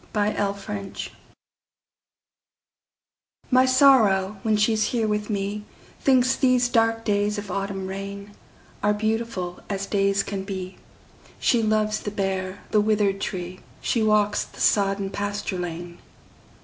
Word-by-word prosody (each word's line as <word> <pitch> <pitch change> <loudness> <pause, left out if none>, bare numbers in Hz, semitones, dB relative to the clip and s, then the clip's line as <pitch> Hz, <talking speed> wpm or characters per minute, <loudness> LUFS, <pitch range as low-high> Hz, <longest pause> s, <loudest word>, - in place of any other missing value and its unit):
My 210 0 +2
November 200 0 -3
Guest - - -7 2.4
MY 255 +1 +5
Sorrow, 220 -8 +4
when 215 0 +1
she's 215 0 +2
here 225 -1 0
with 210 0 -1
me, 205 0 -2 0.4
Thinks 255 -1 +3
these 250 -2 +3
dark 225 -2 +2
days 205 0 +1
of 205 -2 -5
autumn 195 0 -3
rainAre 200 +1 -5
beautiful 215 -5 -2
as 195 -1 -2
days 200 0 +1
can 195 -1 -4
be; 190 -2 -6 0.6
She 235 - +3
loves 215 -1 +1
the - - -4
bare, 190 -1 -3
the 210 - +4
withered 205 -2 +1
tree; 180 -2 -4 0.2
She 230 - 0
walks 210 -1 +2
the - - -15
sodden 195 -1 +2
pasture 205 -2 -3
lane. 175 0 -6
205 Hz, 125 wpm, -24 LUFS, 195-215 Hz, 2.4 s, MY